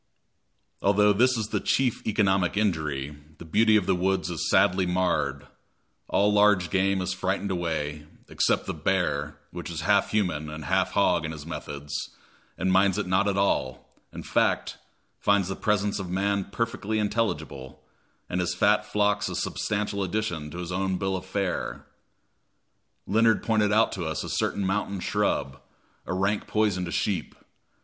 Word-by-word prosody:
Although 105 +1 +4
this 125 +4 +3
is 110 -1 -3
the - - 0
chief 130 -3 0
economic 100 -3 +2
injury, 75 -8 -1 0.2
the 85 - -10
beauty 110 +7 +4
of 105 -4 +3
the 95 - +2
woods 95 0 0
is 85 - -2
sadly 95 0 +3
marred; 85 -7 0 0.6
all 105 +1 +2
large 105 -5 +4
game 95 0 +2
is 90 0 -2
frightened 95 +2 -2
away, 75 -4 -3 0.2
except - - +1
the - - -3
bear, 75 -3 -1
which 90 0 -7
is 80 -2 -4
half 100 +4 +3
human 90 -8 -1
and 75 0 -7
half - - +1
hog - - +3
in 80 - -3
his 75 -2 -8
methods, 75 -3 -7 0.6
and 95 0 0
minds 95 0 +4
it 105 - -1
not 95 +2 +2
at 100 -1 0
all 65 -10 -1 0.2
in - - -8
fact, - - 0 0.4
finds 100 -2 +2
the 95 - -2
presence 105 -1 0
of 95 -2 -5
man 100 +1 0
perfectly 110 0 -2
intelligible, 105 - -2 0.5
and 90 - -2
his 90 0 -1
fat 105 +3 +3
flocks 105 -1 0
a - - -4
substantial 105 -1 -2
addition 90 -5 -2
to 85 - -9
his 90 0 -5
own 95 0 -1
bill 95 0 -1
of 95 0 -6
fare. 95 -1 -3 1.2
Leonard 110 +2 +3
pointed 110 -2 +2
out 110 +2 +4
to 95 - -4
us 80 -1 -2
a - - -6
certain 100 - -1
mountain 100 0 -1
shrub, 70 -5 -1 0.5
a - - -2
rank 100 +2 0
poison 105 -4 +1
to 85 - -6
sheep. 95 -1 -1
95 Hz, 165 wpm, -26 LUFS, 85-105 Hz, 1.2 s, Although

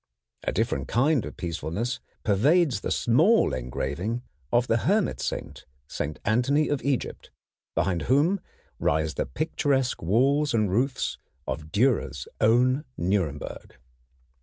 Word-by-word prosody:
A - - 0
different 65 -1 -1
kind 135 0 +2
of - - -10
peacefulness 90 +7 -3 0.2
pervades 135 - +3
the - - -3
small 160 - +3
engraving 70 - -3 0.3
of 120 0 +3
the 115 - +2
Hermit 200 - +1
Saint, - - -4 0.6
Anthony 135 +7 +2
of 145 -2 0
Egypt, 140 -2 -2 0.5
behind 90 -3 +1
whom 155 +9 +3 0.4
rise 80 +1 +1
the - - -2
picturesque 140 -5 0
walls 135 - +2
and 105 -4 +2
roofs 125 +6 0 0.3
of 75 +3 -4
Dürer's 105 - +1
own 125 +5 +3
Nuremberg. 85 -5 -2
120 Hz, 115 wpm, -26 LUFS, 90-140 Hz, 0.6 s, pervades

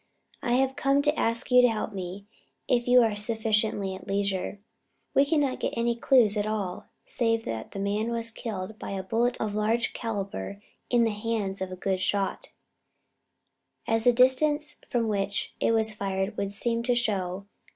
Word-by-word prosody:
I 240 - 0
have 265 +1 +2
come 275 +1 +2
to 295 +1 +2
ask 230 0 0
you 250 0 +8
to 245 - +6
help 215 -1 -3
me, 190 +1 -6 0.4
if 240 -1 +1
you 250 0 +7
are 220 -2 +1
sufficiently 215 -2 0
at 190 - -10
leisure. 195 0 -1 0.5
We 275 - +5
cannot 285 -3 +1
get - - -2
any 235 0 +1
clues 235 -3 +4
at 205 0 0
all, 200 -4 -3 0.2
save 225 -1 0
that 110 -1 -4
the - - -6
man 205 +3 -1
was 230 -1 -1
killed 215 -2 -6
by - - -5
a 190 -1 -3
bullet 235 +5 0
of 215 -2 -2
large 220 +3 0
calibre 200 - -4 0.3
in 240 -1 +4
the 225 - +2
hands 210 -2 -2
of 190 0 -3
a - - -4
good 185 0 -1
shot, 195 +1 -1 1.4
as 225 0 +1
the 245 - +7
distance 295 +5 +3
from 235 -3 0
which 200 -1 -2
it - - +2
was 220 -1 +2
fired 195 0 -2
would 200 -1 -2
seem 230 +3 0
to 245 +1 +1
show. 195 -5 -1
220 Hz, 180 wpm, -27 LUFS, 200-240 Hz, 1.4 s, you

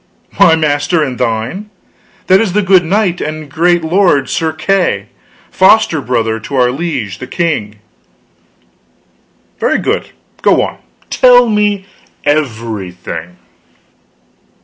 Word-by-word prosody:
"My 160 - +6
master 155 +1 0
and 130 -4 -4
thine? 115 - -3 0.6
That 190 +2 +4
is 205 -6 -1
the 210 +1 +1
good 190 -1 +4
knight 185 0 0
and 155 -1 -5
great 175 +2 +2
lord 165 -5 +2
Sir 160 -1 -1
Kay 155 - -14
the 195 - +2
Seneschal, 100 +2 -12 0.4
foster 190 -5 +3
brother 115 -3 -1
to 135 +6 -7
our 125 -1 +3
liege 125 - -4
the 130 - -7
king." 150 - -2 1.8
"Very - - +1
good; - - -2 0.3
go - - +3
on, - - -5 0.3
tell 245 -1 +5
me 210 -2 0 0.4
everything." 110 - -3
155 Hz, 125 wpm, -13 LUFS, 115-185 Hz, 1.8 s, My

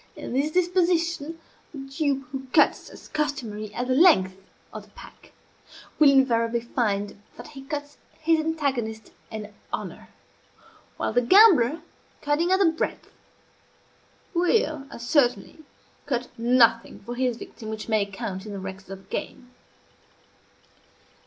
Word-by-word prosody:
In - - -7
this 280 +4 +1
disposition, 340 -2 0 0.3
the 300 - -10
dupe 275 0 -2
who 265 -1 -6
cuts, - - +3
as - - -13
customary, 225 -9 -3
at 245 +4 -3
the 255 - +1
length 255 - +5 0.4
of - - -7
the - - -24
pack, - - -15 0.7
will 300 -2 +8
invariably 235 -4 +3
find 205 -4 -2 0.2
that 240 - -10
he 280 -3 -10
cuts 290 +1 -6 0.2
his 320 0 +2
antagonist 275 -9 -2 0.2
an 215 -1 -7 0.2
honor; - - -6 0.9
while - - -2
the 245 - +4
gambler, 320 - +6 0.4
cutting 310 +5 0
at 375 - +5
the 390 - +3
breadth, 325 -1 -2 1.2
will, 335 -5 +1
as 235 - -8
certainly, 245 -2 +1 0.5
cut 250 -3 -2
nothing 230 -1 +3
for 240 - -6
his 250 -1 -1
victim 220 -2 -9
which 220 -1 -6
may 215 -2 +2
count 200 -1 -6
in 210 - -6
the 200 - -5
records 190 0 -8
of 195 0 -9
the 190 - -29
game. 250 -1 -6
260 Hz, 140 wpm, -25 LUFS, 225-310 Hz, 1.2 s, will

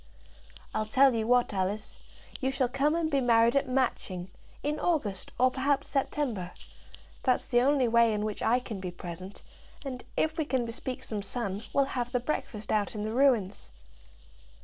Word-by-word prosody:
"I'll 215 0 -1
tell 265 +4 +5
you 225 -1 -1
what, 245 -2 +3
Alice; 200 +2 -2 0.4
you 265 - 0
shall 265 -1 +1
come 275 +5 +1
and 330 -2 0
be 280 -1 +2
married 235 0 +4
at 275 -1 +2
Matching, 190 -8 -1 0.3
in 300 +1 -1
August, 230 - -1
or 255 +1 +4
perhaps 275 +1 0
September. 260 -9 -1 0.7
That's 255 - +2
the 240 -2 +3
only 270 -1 +3
way 235 0 +4
in 210 0 -1
which 215 -1 -4
I 240 - +3
can 220 -5 -6
be 185 -1 -4
present; 175 +2 -8 0.4
and 255 -2 -5
if 315 +1 +1
we 315 - +1
can 260 -4 0
bespeak 245 +2 -5
some 210 -2 -4
sun, 200 -1 -3
we'll 275 - +3
have 245 -2 -3
the 250 - +2
breakfast 225 -5 -4
out 210 0 0
in 210 - -3
the 215 +1 -3
ruins." 235 - +2
245 Hz, 175 wpm, -29 LUFS, 210-270 Hz, 0.7 s, tell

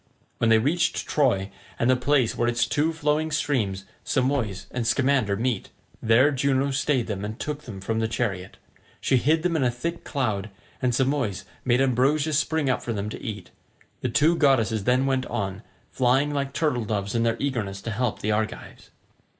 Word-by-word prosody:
When 115 - +2
they 110 - +6
reached 165 +9 +1
Troy 115 -10 +1 0.3
and 120 - +1
the 130 - +5
place 125 -1 +2
where 120 - 0
its 120 0 +2
two 145 +6 +1
flowing 155 0 0
streams 120 -11 -1 0.2
Simois 125 -7 0
and 120 -2 -2
Scamander 130 -3 +2
meet, 115 -2 -1 0.3
there 120 +6 +4
Juno 140 0 +1
stayed 135 -2 +1
them 100 -3 -4
and 105 +2 -5
took 150 0 -4
them 105 -6 -8
from 110 +3 -2
the 110 - +1
chariot. 100 -5 -3 0.4
She 130 - +2
hid 155 +6 +2
them 175 -2 +1
in 150 - +1
a 125 - +3
thick 165 +8 -4
cloud, 110 -7 -2 0.3
and 125 - +2
Simois 130 -7 0 0.2
made 125 0 +2
ambrosia 135 +4 +2
spring 155 0 +1
up 130 - +1
for 115 - -3
them 105 0 -3
to - - -7
eat; 105 -7 -6 0.5
the - - -2
two 160 +4 +3
goddesses 115 -9 +2
then 125 +2 +3
went 130 -1 0
on, 95 -1 -3 0.3
flying 135 +3 +2
like 140 -1 -2
turtledoves 110 -10 -1
in 115 - +1
their 115 0 +1
eagerness 110 -8 -2
to 115 - -3
help 110 +1 -1
the 105 - 0
Argives. 110 +2 -4
125 Hz, 185 wpm, -25 LUFS, 110-140 Hz, 0.5 s, they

